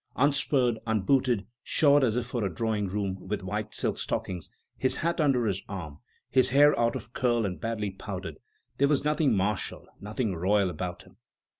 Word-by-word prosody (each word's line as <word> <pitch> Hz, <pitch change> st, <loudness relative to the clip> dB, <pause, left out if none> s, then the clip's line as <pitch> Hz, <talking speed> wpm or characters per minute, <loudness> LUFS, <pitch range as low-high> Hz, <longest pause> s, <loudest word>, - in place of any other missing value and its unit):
Unspurred, 135 Hz, -4 st, +2 dB
unbooted, 110 Hz, +1 st, +2 dB, 0.2 s
shod 145 Hz, +1 st, +4 dB
as 115 Hz, -4 st, +2 dB
if 125 Hz, -1 st, -1 dB
for 120 Hz, -2 st, -3 dB
a 95 Hz, -, -1 dB
drawing 110 Hz, +1 st, -1 dB
room, 95 Hz, -1 st, -3 dB
with 100 Hz, 0 st, -3 dB
white 105 Hz, +3 st, -3 dB
silk -, -, -1 dB
stockings, 90 Hz, -3 st, -3 dB, 0.3 s
his 130 Hz, -, +2 dB
hat 170 Hz, 0 st, 0 dB
under 135 Hz, -5 st, +3 dB
his 100 Hz, -2 st, -1 dB
arm, 85 Hz, -8 st, -6 dB, 0.3 s
his 130 Hz, -1 st, +4 dB
hair 145 Hz, +3 st, +6 dB
out 120 Hz, +1 st, +2 dB
of 115 Hz, -2 st, -7 dB
curl 120 Hz, -3 st, +1 dB
and 90 Hz, -2 st, -4 dB
badly 110 Hz, -3 st, -2 dB
powdered, 95 Hz, -, -7 dB, 0.4 s
there 140 Hz, -, +5 dB
was 145 Hz, -1 st, +1 dB
nothing 150 Hz, -1 st, +2 dB
martial, 100 Hz, +1 st, -1 dB
nothing 105 Hz, -1 st, -2 dB
royal 95 Hz, +2 st, +2 dB
about 90 Hz, +2 st, -5 dB
him. -, -, -21 dB
110 Hz, 175 wpm, -28 LUFS, 95-130 Hz, 0.4 s, hair